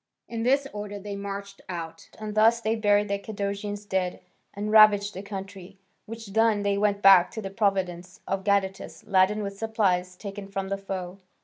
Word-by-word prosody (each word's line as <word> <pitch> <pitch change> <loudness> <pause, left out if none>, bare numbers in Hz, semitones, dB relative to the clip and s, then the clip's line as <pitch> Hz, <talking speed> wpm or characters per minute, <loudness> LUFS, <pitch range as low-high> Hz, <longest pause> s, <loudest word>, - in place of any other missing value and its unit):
In 230 -1 -4
this 270 +4 +2
order 205 -1 -6
they 200 0 -6
marched 200 0 -7
out, 165 -2 -7
and 215 -1 -6
thus 225 +2 +4
they 225 -1 0
buried 205 -1 +2
the 200 0 -1
Cadousian 200 0 -4
dead 185 -2 -1 0.3
and 210 +1 -4
ravaged 210 -1 +6
the 190 - -6
country. 195 -1 -8 0.3
Which 225 -2 -9
done, 220 -2 +3
they 200 0 +1
went 200 0 0
back 190 -2 +8
to - - -5
the 195 - -5
province 185 -4 -1
of 195 0 -2
Gadatas, 195 -1 -1
laden 195 +2 +2
with 200 0 -6
supplies 190 -5 0
taken 200 0 -7
from 195 -1 -4
the 195 - -1
foe. 190 -1 -6
200 Hz, 180 wpm, -26 LUFS, 195-210 Hz, 0.3 s, back